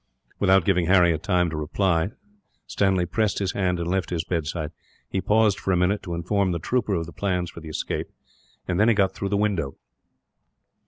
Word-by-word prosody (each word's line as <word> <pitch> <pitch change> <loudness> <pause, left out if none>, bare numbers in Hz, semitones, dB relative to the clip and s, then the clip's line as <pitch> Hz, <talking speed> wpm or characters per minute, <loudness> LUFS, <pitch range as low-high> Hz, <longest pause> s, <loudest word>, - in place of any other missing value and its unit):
Without 95 -3 +4
giving 90 -4 +2
Harry 90 -3 +5
time 90 -1 +1
to - - -4
reply, 85 +3 0 0.6
Stanley 95 -3 +1
pressed 105 +3 0
his 95 -2 0
hand 90 -3 0
and 85 - -3
left 95 +1 -1
his 85 -3 -1
bedside. 80 -2 -3 0.4
He 95 - -2
paused 105 -1 +3
for 95 - -1
a 90 - +3
minute, 90 +4 +1
to 85 -3 -5
inform 95 +2 0
the - - -1
trooper 110 +3 0
of 85 -1 -2
the 85 - -11
plans 90 -4 -1
for - - -10
the 80 -1 -9
escape, 75 - -3 0.6
and 90 0 0
then 105 - +5
he 115 - +4
got 95 -2 +2
through 100 - -3
the 100 - +1
window. 95 -10 0
90 Hz, 200 wpm, -24 LUFS, 85-100 Hz, 0.6 s, Harry